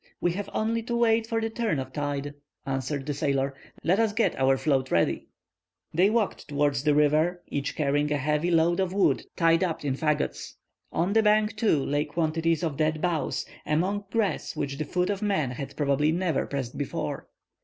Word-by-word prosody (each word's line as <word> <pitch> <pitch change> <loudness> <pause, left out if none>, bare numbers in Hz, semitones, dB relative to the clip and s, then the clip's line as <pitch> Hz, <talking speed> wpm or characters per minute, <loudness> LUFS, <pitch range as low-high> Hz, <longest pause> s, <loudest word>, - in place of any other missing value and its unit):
"We 175 - +1
have 200 +3 -4
only 230 +1 0
to 235 +1 -3
wait 225 -1 +3
for 225 0 0
the 225 0 -2
turn 225 -9 -1
of 130 -1 -5
tide," 145 -1 -3 0.3
answered 135 +1 -2
the 145 - -2
sailor. 140 -2 0 0.3
"Let 185 +6 +3
us 225 -2 +2
get 225 +1 +1
our 135 0 +3
float 135 -1 +1
ready." 85 - +1 0.7
They 180 +5 +4
walked 220 -2 -1
towards 145 -2 0
the 150 -1 +3
river, 155 +4 +2
each 140 -1 -3
carrying 145 0 +1
a 145 - +2
heavy 150 +4 0
load 170 +1 +3
of 190 -1 0
wood 200 - +2
tied 165 0 +3
up 165 -4 -2
in 135 - +1
fagots. 150 +2 -1 0.4
On 175 +5 0
the 225 - +5
bank, 215 0 +3
too, 205 -11 +2
lay 145 +1 0
quantities 165 +1 0
of 155 -5 -2
dead 155 0 +1
boughs, 170 -2 -1 0.2
among 190 +7 0
grass 210 -8 -1
which 140 0 -3
the 155 - -1
foot 180 +4 0
of 200 0 -3
man 190 -11 0
had 135 +2 -7
probably 145 +1 +2
never 170 -3 0
pressed 135 -3 -4
before. 145 - -3
155 Hz, 190 wpm, -27 LUFS, 145-190 Hz, 0.7 s, the